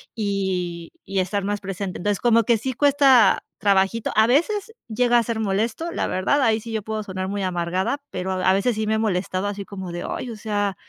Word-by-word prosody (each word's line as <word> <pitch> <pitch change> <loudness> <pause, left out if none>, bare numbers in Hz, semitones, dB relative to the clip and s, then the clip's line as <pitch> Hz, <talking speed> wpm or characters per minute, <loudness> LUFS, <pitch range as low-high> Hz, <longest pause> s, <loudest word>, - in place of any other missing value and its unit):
y 190 -5 -2
y 195 - -2
estar 190 +2 -1
más 205 +1 -1
presente. 195 -1 -5
Entonces, 205 +1 -1
como 230 -1 +4
que 230 +1 +3
sí 260 +5 -3
cuesta 270 -5 +4
trabajito. 200 +2 +1
A 220 - +6
veces 380 - +1
llega 240 +2 +3
a - - +1
ser 230 0 -3
molesto, 220 - -1
la - - -1
verdad, 200 +10 +1
ahí 225 -3 +3
sí 230 +1 -9
yo 220 -1 -2
puedo 215 +1 -4
sonar 185 -2 -4
muy 200 0 -3
amargada, 185 +8 -1
pero 185 +1 -3
a 185 0 +1
a - - +5
veces 200 +6 +1
sí 215 0 -1
me 220 - +2
he - - +1
molestado 185 -3 -1
así 205 -1 -4
como 190 -3 -7
de: 175 0 -5
"Ay, 250 - -4
o - - -6
sea 205 -2 -2
205 Hz, 220 wpm, -23 LUFS, 190-230 Hz, -, A